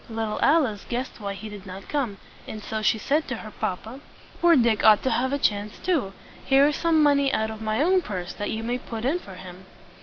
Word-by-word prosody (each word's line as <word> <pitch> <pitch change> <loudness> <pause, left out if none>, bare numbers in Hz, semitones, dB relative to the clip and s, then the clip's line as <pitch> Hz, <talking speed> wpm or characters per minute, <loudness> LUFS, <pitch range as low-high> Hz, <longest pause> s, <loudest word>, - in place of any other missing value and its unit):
Little 225 -1 -3
Alice 275 -10 +3
guessed 245 +1 -4
why 200 -1 -4
he 215 +2 -8
did 205 -2 -10
not 190 +1 -9
come, 255 -9 -2 0.3
and 215 -1 -7
so 220 +1 -3
she 215 - +2
said 295 +8 0
to 245 - -3
her 215 -1 -9
papa, 220 +7 -4 0.4
"Poor 345 -1 +6
Dick 235 -5 +3
ought 215 -1 +6
to 260 - +1
have 260 +2 0
a 280 - +1
chance 210 -5 -1
too. 310 - -1 0.3
Here 270 +1 +5
is 295 0 +2
some 325 -2 +3
money 280 -2 +3
out 220 0 0
of 220 0 -8
my 220 +5 0
own 370 +2 +3
purse 185 - -5
that 205 - -4
you 220 +1 -3
may 245 +2 -2
put 225 -1 -6
in 310 +7 +1
for 195 - -11
him." 185 0 -11
225 Hz, 235 wpm, -25 LUFS, 205-280 Hz, 0.4 s, Poor